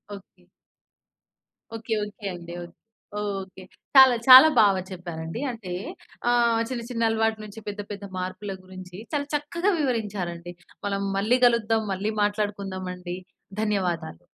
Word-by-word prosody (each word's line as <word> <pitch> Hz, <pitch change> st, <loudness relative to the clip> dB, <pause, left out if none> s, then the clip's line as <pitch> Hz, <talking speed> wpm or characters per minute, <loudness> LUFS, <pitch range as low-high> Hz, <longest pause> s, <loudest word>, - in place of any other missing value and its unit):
Okay. 190 Hz, -2 st, -16 dB, 1.3 s
Okay. 225 Hz, 0 st, -4 dB
Okay 210 Hz, 0 st, -11 dB
అండి. 170 Hz, 0 st, -9 dB
ఒక్ 175 Hz, 0 st, -12 dB, 0.7 s
okay. 190 Hz, 0 st, -12 dB, 0.3 s
చాలా 265 Hz, -2 st, +9 dB
చాలా 260 Hz, +4 st, +12 dB
బాగా 195 Hz, -3 st, +4 dB
చెప్పారండి. 170 Hz, +3 st, -6 dB
అంటే 200 Hz, -6 st, -7 dB, 0.6 s
ఆహ్, 235 Hz, -1 st, +3 dB
చిన్న 245 Hz, -2 st, -3 dB
చిన్న 230 Hz, -2 st, +1 dB
అలవాటు 225 Hz, 0 st, +1 dB
నుంచి 210 Hz, +2 st, -10 dB
పెద్ద 205 Hz, 0 st, -4 dB
పెద్ద 200 Hz, 0 st, -7 dB
మార్పుల 185 Hz, +2 st, -4 dB
గురించి 185 Hz, -1 st, -11 dB, 0.2 s
చాలా 285 Hz, -1 st, -1 dB
చక్కగా 340 Hz, +7 st, 0 dB
వివరించారండి. 195 Hz, -, -2 dB, 0.3 s
మనం 200 Hz, 0 st, -1 dB, 0.2 s
మళ్ళీ 220 Hz, +6 st, +3 dB
గలుద్దాం, 225 Hz, -2 st, +3 dB
మళ్ళీ 205 Hz, +3 st, -2 dB
మాట్లాడుకుందాం 205 Hz, -3 st, -2 dB
అండి. 180 Hz, 0 st, -6 dB, 0.4 s
ధన్యవాదాలు. 180 Hz, -, -2 dB
205 Hz, 125 wpm, -25 LUFS, 185-230 Hz, 1.3 s, చాలా